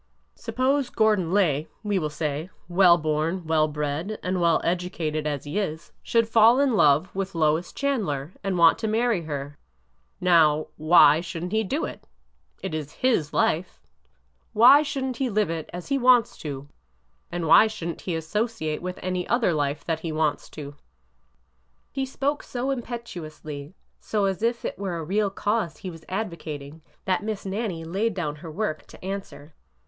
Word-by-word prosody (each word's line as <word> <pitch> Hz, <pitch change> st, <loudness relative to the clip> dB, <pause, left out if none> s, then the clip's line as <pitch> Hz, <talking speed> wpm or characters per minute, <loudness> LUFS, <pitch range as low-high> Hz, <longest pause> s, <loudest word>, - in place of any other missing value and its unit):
Suppose 265 Hz, +1 st, 0 dB
Gordon 210 Hz, -6 st, +2 dB
Lay, 160 Hz, -7 st, +2 dB, 0.2 s
we 205 Hz, -2 st, 0 dB
will 155 Hz, -3 st, -2 dB
say, 150 Hz, +2 st, -3 dB, 0.2 s
well 175 Hz, -1 st, +6 dB
born, 155 Hz, +3 st, -1 dB
well 155 Hz, -1 st, +2 dB
bred, 150 Hz, +7 st, -3 dB
and 180 Hz, 0 st, -1 dB
well 170 Hz, -1 st, +4 dB
educated 165 Hz, -3 st, -2 dB
as 145 Hz, -2 st, -3 dB
he 150 Hz, +8 st, -2 dB
is, 160 Hz, -5 st, -4 dB
should 230 Hz, -1 st, +2 dB
fall 225 Hz, +3 st, +6 dB
in 280 Hz, -3 st, +3 dB
love 150 Hz, 0 st, +4 dB
with 195 Hz, -1 st, -3 dB
Lois 160 Hz, +2 st, +1 dB
Chandler 185 Hz, -, -2 dB
and 195 Hz, -2 st, -1 dB
want 165 Hz, -1 st, +6 dB
to 220 Hz, -, -2 dB
marry 225 Hz, -2 st, +1 dB
her. 145 Hz, -1 st, -5 dB, 0.6 s
Now,— 155 Hz, -4 st, +4 dB, 0.5 s
should 170 Hz, -1 st, -6 dB
n't 180 Hz, -, -4 dB
he 220 Hz, +1 st, +1 dB
do 280 Hz, -, -1 dB
it?... -, -, -9 dB, 0.6 s
It 190 Hz, -4 st, -4 dB
is 155 Hz, -1 st, -4 dB
his 225 Hz, -, +1 dB
life!... 170 Hz, +4 st, 0 dB, 0.7 s
Why 245 Hz, +6 st, +8 dB
should 280 Hz, -2 st, -3 dB
n't 255 Hz, -2 st, -3 dB
he 265 Hz, 0 st, 0 dB
live 210 Hz, -5 st, +1 dB
it 165 Hz, -2 st, -5 dB
as 175 Hz, +6 st, -8 dB
he 275 Hz, -1 st, +1 dB
wants 250 Hz, -2 st, +4 dB
to? 140 Hz, -2 st, -6 dB, 0.6 s
and 175 Hz, -1 st, -3 dB
why 185 Hz, +7 st, +7 dB
should 215 Hz, -6 st, -5 dB
n't 170 Hz, -, -6 dB
he 175 Hz, -, -3 dB
associate 160 Hz, -1 st, -2 dB
with 180 Hz, +1 st, -5 dB
it -, -, -12 dB
any 185 Hz, -1 st, -2 dB
other 235 Hz, -7 st, +2 dB
life 145 Hz, -1 st, -1 dB
that 165 Hz, -2 st, -1 dB
he 160 Hz, 0 st, -4 dB
wants 155 Hz, -1 st, -1 dB
to? 145 Hz, -2 st, -8 dB, 0.6 s
" 65 Hz, 0 st, -43 dB
He 270 Hz, 0 st, -2 dB
spoke 280 Hz, +2 st, -1 dB
so 255 Hz, +2 st, -3 dB
impetuously, 175 Hz, -, -6 dB, 0.2 s
so 210 Hz, -2 st, -1 dB
as 195 Hz, +1 st, -1 dB
if 235 Hz, +1 st, 0 dB
it -, -, -4 dB
were 190 Hz, -4 st, -3 dB
a 165 Hz, -, -4 dB
real 200 Hz, +5 st, +1 dB
cause 205 Hz, -2 st, -1 dB
he 185 Hz, -, -6 dB
was 165 Hz, -1 st, -13 dB
advocating, 160 Hz, -7 st, -5 dB, 0.2 s
that 185 Hz, +1 st, +1 dB
Miss 215 Hz, -2 st, -4 dB
Nannie 195 Hz, -4 st, -3 dB
laid 195 Hz, +5 st, -1 dB
down 150 Hz, -5 st, -3 dB
her 165 Hz, +1 st, -9 dB
work 160 Hz, -1 st, -3 dB
to -, -, -13 dB
answer. 190 Hz, -6 st, -6 dB
180 Hz, 175 wpm, -25 LUFS, 155-215 Hz, 0.7 s, Why